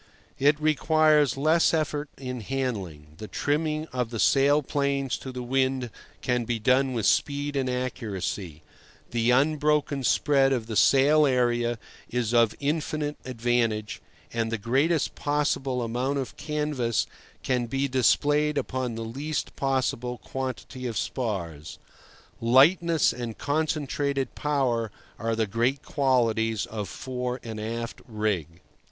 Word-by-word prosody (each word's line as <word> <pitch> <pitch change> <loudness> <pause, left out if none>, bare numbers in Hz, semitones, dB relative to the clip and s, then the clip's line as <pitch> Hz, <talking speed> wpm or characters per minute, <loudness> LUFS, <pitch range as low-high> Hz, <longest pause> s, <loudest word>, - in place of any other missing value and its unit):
It 145 +2 +4
requires 155 -1 +3
less 160 +4 +3
effort 150 -2 -1
in 125 -2 -5
handling; 100 - -4
the 110 - -6
trimming 155 +4 -1
of 125 -2 -1
the 115 - -5
sail 145 +4 +4
planes 140 -1 0
to 130 - -7
the 125 -1 -5
wind 130 -1 0 0.3
can 125 -2 +1
be 115 0 -1
done 130 +4 +2
with 115 -4 -1
speed 145 0 +1
and 135 -2 0
accuracy; 105 - -4 0.5
the 120 0 +1
unbroken 145 +1 +2
spread 135 +1 +3
of 120 -4 -1
the 110 -1 -5
sail 145 +6 +5
area 120 -2 +1 0.3
is 120 -2 -1
of 115 -2 +4
infinite 150 0 -1
advantage; 115 -3 -1 0.3
and 115 -1 -1
the 115 - 0
greatest 135 +9 +1
possible 140 -3 0
amount 125 +5 -1
of 130 -4 -4
canvas 150 - -1 0.4
can 125 -2 0
be 135 +4 0
displayed 145 +4 +2
upon 130 -4 -2
the 115 0 -4
least 140 +7 -4
possible 125 -2 -1
quantity 130 0 -5
of 115 - -4
spars. 85 - -3 0.6
Lightness 160 +8 +4
and 120 -3 -6
concentrated 145 -2 -1
power 130 -6 0 0.3
are 115 0 -1
the 110 0 +1
great 120 +6 0
qualities 115 -5 +1
of 105 -3 -5
fore 125 -1 -4
and 110 -2 -6
aft 115 +2 -5
rig. 100 - -2
130 Hz, 130 wpm, -26 LUFS, 115-145 Hz, 0.6 s, sail